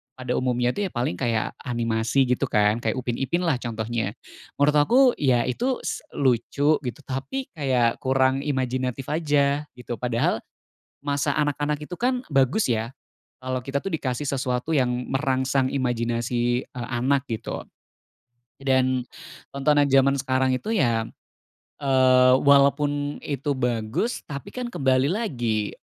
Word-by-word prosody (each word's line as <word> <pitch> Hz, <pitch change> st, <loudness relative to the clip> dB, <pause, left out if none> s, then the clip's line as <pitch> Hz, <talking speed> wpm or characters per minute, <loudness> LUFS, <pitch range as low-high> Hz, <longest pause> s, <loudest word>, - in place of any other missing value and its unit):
pada 125 Hz, -1 st, -5 dB
umumnya 125 Hz, -1 st, +1 dB
tuh 205 Hz, -1 st, -1 dB
ya -, -, -12 dB
paling 120 Hz, -7 st, -1 dB
kayak 115 Hz, -3 st, 0 dB
animasi, 115 Hz, +1 st, +1 dB
gitu, 125 Hz, +2 st, 0 dB
kan? 105 Hz, 0 st, +2 dB
Kayak 110 Hz, -, 0 dB
Upin 120 Hz, -1 st, -2 dB
Ipin 170 Hz, +7 st, 0 dB
lah 165 Hz, -6 st, +2 dB
contohnya. 115 Hz, -2 st, -3 dB, 0.4 s
Menurut 150 Hz, +1 st, +4 dB
aku 240 Hz, -, +4 dB, 0.2 s
ya 125 Hz, -4 st, +3 dB
itu 250 Hz, -, -1 dB
s -, -, -3 dB
lucu, 140 Hz, +4 st, +2 dB
gitu, 125 Hz, +2 st, -5 dB
tapi 140 Hz, -, -4 dB
kayak 125 Hz, -5 st, +1 dB
kurang 130 Hz, +1 st, +2 dB
imajinatif 130 Hz, -2 st, -2 dB
aja, 145 Hz, -2 st, +1 dB
gitu. 125 Hz, -1 st, -6 dB
Padahal 120 Hz, -2 st, 0 dB, 0.6 s
masa 145 Hz, 0 st, 0 dB
anak-anak 145 Hz, 0 st, 0 dB
itu 180 Hz, -, -6 dB
kan 250 Hz, +1 st, +1 dB
bagus 135 Hz, -, +2 dB
ya 115 Hz, +1 st, -1 dB, 0.5 s
kalo 130 Hz, 0 st, -2 dB
kita 140 Hz, +2 st, -2 dB
tuh 195 Hz, -, -4 dB
dikasih 140 Hz, -2 st, -2 dB
sesuatu 130 Hz, +2 st, -1 dB
yang 130 Hz, -3 st, +3 dB, 0.2 s
merangsang 130 Hz, -1 st, +1 dB
imajinasi, 120 Hz, -1 st, 0 dB
eee, 120 Hz, -1 st, -7 dB
anak, 130 Hz, +3 st, 0 dB
gitu. 115 Hz, 0 st, -4 dB, 1.0 s
Dan, 130 Hz, -1 st, +2 dB, 0.5 s
tontonan 145 Hz, +1 st, +3 dB
zaman 135 Hz, +1 st, +5 dB
sekarang 130 Hz, 0 st, +1 dB
itu 210 Hz, -, -5 dB
ya, 115 Hz, -, +2 dB, 0.8 s
eee, 130 Hz, -2 st, +5 dB
walaupun 145 Hz, +1 st, +3 dB
itu 145 Hz, 0 st, -2 dB
bagus, 120 Hz, -, -1 dB
tapi 140 Hz, -2 st, -7 dB
kan 250 Hz, -1 st, -4 dB
kembali 130 Hz, -1 st, +2 dB
lagi 120 Hz, -, -1 dB
130 Hz, 135 wpm, -24 LUFS, 120-145 Hz, 1.0 s, zaman